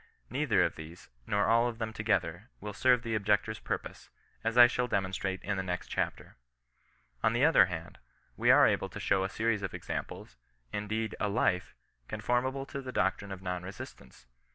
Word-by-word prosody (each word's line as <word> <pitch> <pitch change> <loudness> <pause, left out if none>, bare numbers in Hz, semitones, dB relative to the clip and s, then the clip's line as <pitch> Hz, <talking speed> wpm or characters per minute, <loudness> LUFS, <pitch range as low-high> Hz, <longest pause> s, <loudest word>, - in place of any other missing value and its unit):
Neither - - +2
of - - -1
these, 80 +3 -11 0.2
nor 100 0 +2
all 115 +1 +4
of 115 -2 -4
them 110 -1 -4
to 110 - -5
gether, 105 -1 0
will 105 0 -6
serve 125 +3 +3
the 115 -2 -3
objector's 105 0 +1
purpose, - - -5 0.3
as 115 +1 -1
I 120 - +11
shall 125 +1 0
de 110 - -1
monstrate 95 0 -3
in 100 -1 -1
the - - 0
next 90 -1 -4
chapter. - - -3 0.9
On 110 - +3
the 120 +5 +3
other 160 - +7
hand, 85 -2 -7 0.4
we - - +1
are - - +8
able - - +1
to - - -8
show 95 -1 +2
a 95 - -1
series 110 0 0
of 95 - -4
examples, - - -6 0.4
indeed 110 +1 -2
a 105 - 0
life, 100 -4 0 0.3
con - - -5
formable 130 +3 0
to 140 - -5
the 130 -1 -6
doctrine 95 -2 0
of 95 -1 -7
non 90 -1 -2
resistance. 90 -7 -10
105 Hz, 195 wpm, -31 LUFS, 95-115 Hz, 0.9 s, I